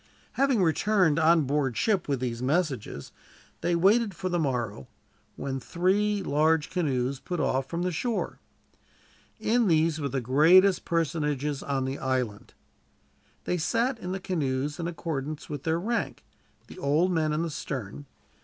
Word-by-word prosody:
Having 265 Hz, -7 st, +2 dB
returned 175 Hz, -1 st, +2 dB
on 165 Hz, 0 st, +5 dB
board 135 Hz, -2 st, 0 dB
ship 205 Hz, -6 st, +1 dB
with 140 Hz, -3 st, 0 dB
these 120 Hz, -2 st, -3 dB
messages, 135 Hz, -, -1 dB, 0.5 s
they 175 Hz, -, +1 dB
waited 200 Hz, +3 st, +3 dB
for 185 Hz, -, -3 dB
the 175 Hz, -1 st, 0 dB
morrow, 120 Hz, -, -2 dB, 0.5 s
when 135 Hz, -1 st, -4 dB
three 195 Hz, +7 st, 0 dB
large 155 Hz, +1 st, +2 dB
canoes 135 Hz, -6 st, -1 dB
put 180 Hz, +3 st, -4 dB
off 130 Hz, 0 st, 0 dB
from 170 Hz, +1 st, -2 dB
the 180 Hz, -, 0 dB
shore. 230 Hz, +6 st, -2 dB, 1.0 s
In 235 Hz, 0 st, +2 dB
these 160 Hz, -2 st, +2 dB
were 140 Hz, -, -1 dB
the 135 Hz, -, -1 dB
greatest 165 Hz, -, +5 dB
personages 150 Hz, -4 st, -1 dB
on 135 Hz, -2 st, -1 dB
the 135 Hz, +1 st, -4 dB
island. 125 Hz, -6 st, -2 dB, 0.9 s
They 180 Hz, -, -1 dB
sat 235 Hz, -, 0 dB
in 180 Hz, -4 st, -5 dB
the 190 Hz, -, -3 dB
canoes 145 Hz, -5 st, -2 dB
in 170 Hz, -, -2 dB
accordance 155 Hz, -3 st, -4 dB
with 145 Hz, -2 st, -6 dB
their 165 Hz, +1 st, +1 dB
rank, 235 Hz, +6 st, -2 dB, 0.4 s
the -, -, -12 dB
old 165 Hz, +4 st, +2 dB
men 160 Hz, -3 st, +1 dB
in 155 Hz, +2 st, 0 dB
the 170 Hz, -, -3 dB
stern. 135 Hz, -1 st, -6 dB
160 Hz, 155 wpm, -27 LUFS, 135-180 Hz, 1.0 s, on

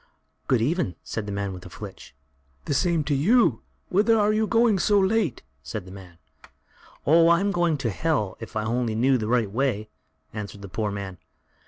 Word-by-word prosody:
"Good 120 Hz, -4 st, +2 dB
even," 140 Hz, -, 0 dB
said 110 Hz, -2 st, -5 dB
the -, -, -4 dB
man 100 Hz, -1 st, -3 dB
with 90 Hz, -, -9 dB
the -, -, -11 dB
flitch. -, -, -10 dB, 0.5 s
"The -, -, -1 dB
same 170 Hz, +2 st, +1 dB
to 145 Hz, +1 st, -1 dB
you; 170 Hz, -, +3 dB, 0.3 s
whither 215 Hz, +4 st, +3 dB
are 210 Hz, 0 st, +3 dB
you 215 Hz, 0 st, +1 dB
going 230 Hz, -3 st, +3 dB
so 205 Hz, +3 st, +3 dB
late?" 195 Hz, -, +1 dB, 0.2 s
said 90 Hz, +8 st, -6 dB
the 95 Hz, -, -11 dB
man. 95 Hz, -3 st, -12 dB, 0.9 s
"Oh! 165 Hz, +3 st, +6 dB
I'm 185 Hz, +4 st, +3 dB
going 175 Hz, -4 st, +1 dB
to 115 Hz, -4 st, -2 dB
Hell, 135 Hz, -7 st, -1 dB
if 115 Hz, -, -9 dB
I 110 Hz, -, 0 dB
only 115 Hz, 0 st, -1 dB
knew 130 Hz, +3 st, +3 dB
the 110 Hz, -, -3 dB
right 115 Hz, -4 st, +1 dB
way," 110 Hz, -3 st, -1 dB, 0.4 s
answered 100 Hz, -2 st, -7 dB
the 100 Hz, -, -8 dB
poor 105 Hz, +2 st, -2 dB
man. 100 Hz, -3 st, -6 dB
125 Hz, 190 wpm, -25 LUFS, -, 0.9 s, Oh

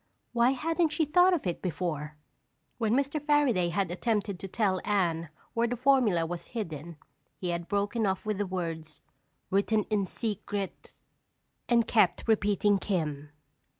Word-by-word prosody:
Why 240 Hz, +2 st, +4 dB
hadn't 325 Hz, +5 st, +1 dB
she 315 Hz, +1 st, +1 dB
thought 355 Hz, +5 st, +5 dB
of 345 Hz, -, 0 dB
it 175 Hz, -, -2 dB
before? 155 Hz, -4 st, -3 dB, 0.6 s
When 225 Hz, 0 st, +2 dB
Mr. 280 Hz, +3 st, 0 dB
Fairaday 280 Hz, -, +3 dB
had 180 Hz, 0 st, -1 dB
attempted 205 Hz, 0 st, -1 dB
to 195 Hz, -, -6 dB
tell 190 Hz, -2 st, 0 dB
Anne 170 Hz, -6 st, 0 dB, 0.2 s
where 235 Hz, 0 st, +2 dB
the 245 Hz, -, -2 dB
formula 245 Hz, -9 st, +3 dB
was 175 Hz, +1 st, -6 dB
hidden 165 Hz, -5 st, -5 dB, 0.4 s
he 180 Hz, -, -3 dB
had 170 Hz, 0 st, -3 dB
broken 205 Hz, +2 st, 0 dB
off 190 Hz, +1 st, -1 dB
with 215 Hz, -2 st, -1 dB
the 205 Hz, -, 0 dB
words: 165 Hz, -5 st, -4 dB, 0.5 s
"Written 205 Hz, +2 st, +2 dB
in 200 Hz, -3 st, +1 dB
secret—" 205 Hz, -2 st, -4 dB, 0.7 s
and 235 Hz, -2 st, +4 dB
kept 215 Hz, -7 st, +3 dB
repeating 205 Hz, -2 st, +3 dB
"Kim." 150 Hz, -8 st, -2 dB
200 Hz, 150 wpm, -29 LUFS, 175-235 Hz, 0.7 s, thought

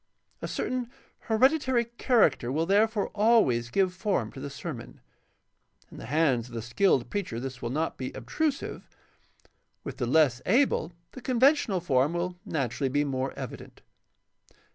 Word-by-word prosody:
A -, -, -3 dB
certain 250 Hz, -2 st, -3 dB, 0.4 s
hereditary 260 Hz, +1 st, +3 dB
character 225 Hz, -, +2 dB
will 160 Hz, +4 st, 0 dB
therefore 210 Hz, +2 st, +2 dB
always 205 Hz, -, +3 dB
give 185 Hz, +6 st, +1 dB
form 185 Hz, -, -1 dB
to -, -, -10 dB
the 140 Hz, +1 st, -5 dB
sermon. -, -, -8 dB, 0.9 s
In -, -, -11 dB
the -, -, -8 dB
hands 135 Hz, -5 st, +1 dB
of 120 Hz, -, -11 dB
the 115 Hz, -, -3 dB
skilled 130 Hz, -, +1 dB
preacher 195 Hz, -, -3 dB
this 130 Hz, 0 st, -6 dB
will 120 Hz, -, -3 dB
not 155 Hz, +6 st, -2 dB
be 130 Hz, -, -4 dB
obtrusive; 280 Hz, -, -3 dB, 0.9 s
with -, -, -7 dB
the 125 Hz, -, -2 dB
less 130 Hz, -3 st, +3 dB
able 230 Hz, -, +2 dB, 0.2 s
the 255 Hz, -, -10 dB
conventional 255 Hz, -, +3 dB
form 140 Hz, -1 st, +2 dB
will 175 Hz, +1 st, -2 dB
naturally 135 Hz, -2 st, -1 dB
be 145 Hz, +3 st, +1 dB
more 135 Hz, -1 st, -2 dB
evident. -, -, -9 dB
160 Hz, 145 wpm, -28 LUFS, -, 0.9 s, hereditary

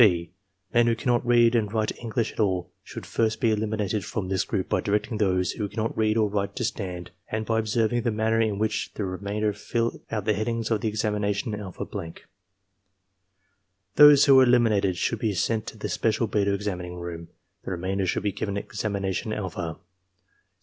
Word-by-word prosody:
(6) 85 Hz, -7 st, +4 dB, 0.4 s
Men 120 Hz, 0 st, +4 dB
who 115 Hz, -, +3 dB
cannot 120 Hz, +1 st, +1 dB
read 120 Hz, -1 st, +4 dB
and 110 Hz, -4 st, +1 dB
write 110 Hz, -1 st, -1 dB
English 115 Hz, -1 st, -2 dB
at -, -, -15 dB
all 95 Hz, -4 st, 0 dB
should -, -, -8 dB
first 110 Hz, -1 st, 0 dB
be 115 Hz, -, +3 dB
eliminated 105 Hz, -1 st, -1 dB
from 95 Hz, +1 st, -4 dB
this 95 Hz, -1 st, +1 dB
group 100 Hz, -5 st, -2 dB
by -, -, +1 dB
directing 105 Hz, +2 st, -1 dB
those 90 Hz, -3 st, +2 dB
who 105 Hz, -2 st, -4 dB
can -, -, -15 dB
not 110 Hz, +1 st, -1 dB
read 110 Hz, 0 st, +2 dB
or 110 Hz, -1 st, +3 dB
write 100 Hz, -1 st, -2 dB
to 125 Hz, -, -2 dB
stand, 90 Hz, -6 st, -4 dB, 0.2 s
and 110 Hz, 0 st, -2 dB
by 115 Hz, 0 st, +1 dB
observing 110 Hz, +2 st, +1 dB
the 120 Hz, -, 0 dB
manner 110 Hz, +1 st, +1 dB
in 110 Hz, -3 st, 0 dB
which 110 Hz, +1 st, -1 dB
the 105 Hz, -, -2 dB
remainder 100 Hz, +3 st, -2 dB
fill 115 Hz, +3 st, -2 dB
out 105 Hz, -3 st, -3 dB
the 110 Hz, -, +3 dB
headings 115 Hz, +2 st, -2 dB
of 110 Hz, -2 st, +1 dB
the -, -, -1 dB
examination 105 Hz, 0 st, -1 dB
alpha 100 Hz, -3 st, -5 dB
blank. 80 Hz, -1 st, -7 dB, 1.7 s
Those 150 Hz, -1 st, +8 dB
who 135 Hz, -3 st, +7 dB
are -, -, +8 dB
eliminated 110 Hz, -7 st, +3 dB
should 115 Hz, -, -1 dB
be 110 Hz, -3 st, 0 dB
sent 110 Hz, +3 st, 0 dB
to -, -, -7 dB
the -, -, -4 dB
special 115 Hz, +1 st, 0 dB
beta 100 Hz, -2 st, +1 dB
examining 95 Hz, -3 st, -3 dB
room; 85 Hz, -1 st, -7 dB, 0.4 s
the -, -, -6 dB
remainder 95 Hz, +1 st, -2 dB
should -, -, -1 dB
be 105 Hz, -, +1 dB
given 100 Hz, +1 st, -3 dB
examination 100 Hz, -2 st, -3 dB
alpha. 90 Hz, -6 st, -4 dB
105 Hz, 190 wpm, -26 LUFS, 100-115 Hz, 1.7 s, Those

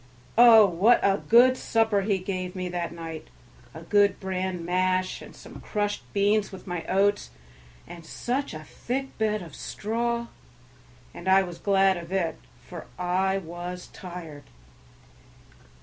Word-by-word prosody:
Oh, 230 Hz, -2 st, +8 dB
what 200 Hz, +6 st, +4 dB
a 195 Hz, 0 st, +3 dB
good 250 Hz, +3 st, +7 dB
supper 220 Hz, -4 st, +1 dB
he 200 Hz, 0 st, 0 dB
gave 185 Hz, -1 st, -4 dB
me 185 Hz, -1 st, -3 dB
that 175 Hz, -1 st, -3 dB
night, 165 Hz, -2 st, -8 dB, 0.4 s
a 160 Hz, -, -10 dB
good 200 Hz, +2 st, +3 dB
bran 185 Hz, -2 st, -3 dB
mash 185 Hz, +1 st, 0 dB
and -, -, -12 dB
some -, -, -12 dB
crushed 205 Hz, -1 st, -2 dB
beans 205 Hz, +1 st, +1 dB
with 190 Hz, -, -11 dB
my 175 Hz, -2 st, -4 dB
oats, 195 Hz, -, +1 dB, 0.6 s
and 170 Hz, -1 st, -11 dB
such 250 Hz, -, -3 dB
a 155 Hz, -, -8 dB
thick 270 Hz, -, -5 dB
bed 215 Hz, -2 st, 0 dB
of 165 Hz, -5 st, -12 dB
straw! 235 Hz, +2 st, -3 dB, 0.9 s
and 175 Hz, -, -9 dB
I 190 Hz, +1 st, +5 dB
was 175 Hz, -2 st, -8 dB
glad 195 Hz, 0 st, +3 dB
of 170 Hz, 0 st, -9 dB
it, 175 Hz, -4 st, -1 dB, 0.3 s
for 175 Hz, -3 st, -9 dB
I 185 Hz, +2 st, 0 dB
was 175 Hz, 0 st, -7 dB
tired. 170 Hz, -6 st, -9 dB
190 Hz, 145 wpm, -26 LUFS, 175-210 Hz, 0.9 s, Oh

